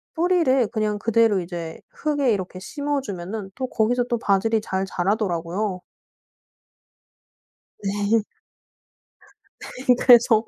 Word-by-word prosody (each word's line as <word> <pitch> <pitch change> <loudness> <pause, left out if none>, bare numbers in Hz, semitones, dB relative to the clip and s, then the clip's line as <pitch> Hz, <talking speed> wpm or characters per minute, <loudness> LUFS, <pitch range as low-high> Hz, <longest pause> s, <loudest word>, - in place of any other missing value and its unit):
뿌리를 325 -8 +3
그냥 210 -1 -1
그대로 225 -2 +3
이제 170 -2 -6
흙에 290 -5 0
이렇게 185 -2 -4
심어 285 +8 -2
주면은 195 -2 -6
또 260 -1 -3
거기서 240 +2 +1
또 240 - +1
바질이 220 +2 +2
잘 190 -2 -2
자라더라고요. 185 0 -1 2.0
네. 205 +2 +1 1.4
네. 250 0 0
그래서 235 -3 +6
215 Hz, 230 characters per minute, -23 LUFS, 190-245 Hz, 2.0 s, 그래서